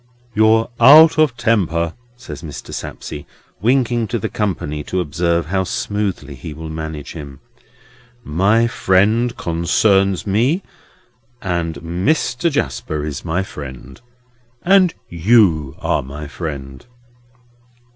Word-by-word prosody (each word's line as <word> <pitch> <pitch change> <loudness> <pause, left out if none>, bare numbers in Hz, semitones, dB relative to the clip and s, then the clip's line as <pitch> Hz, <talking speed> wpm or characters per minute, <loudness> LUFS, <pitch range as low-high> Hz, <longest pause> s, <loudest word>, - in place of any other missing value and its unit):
"You're 110 +2 +3
out 155 +3 +8
of 145 -6 +3
temper," 85 -8 +1 0.2
says 75 - -9
Mr. 75 -4 -8
Sapsea, 75 - -6 0.4
winking 120 -1 +2
to 120 - -2
the 105 - -3
company 75 -8 -3
to 95 - -2
observe 85 +1 0
how 95 +3 0
smoothly 95 -5 -3
he 75 +4 -8
will 80 +1 -7
manage 80 -2 -6
him. 70 -4 -9 0.8
"My 100 +9 +2
friend 110 +3 +2
concerns 95 +3 +1
me, 120 - +1 0.8
and 85 -4 -2
Mr. 120 - 0
Jasper 80 - -2
is 75 -3 -5
my 90 +3 -1
friend. 70 - -10 0.6
And 185 -2 +4
you 85 - +3
are - - 0
my 75 +3 -8
friend." 70 -4 -7
90 Hz, 115 wpm, -18 LUFS, 80-115 Hz, 0.8 s, out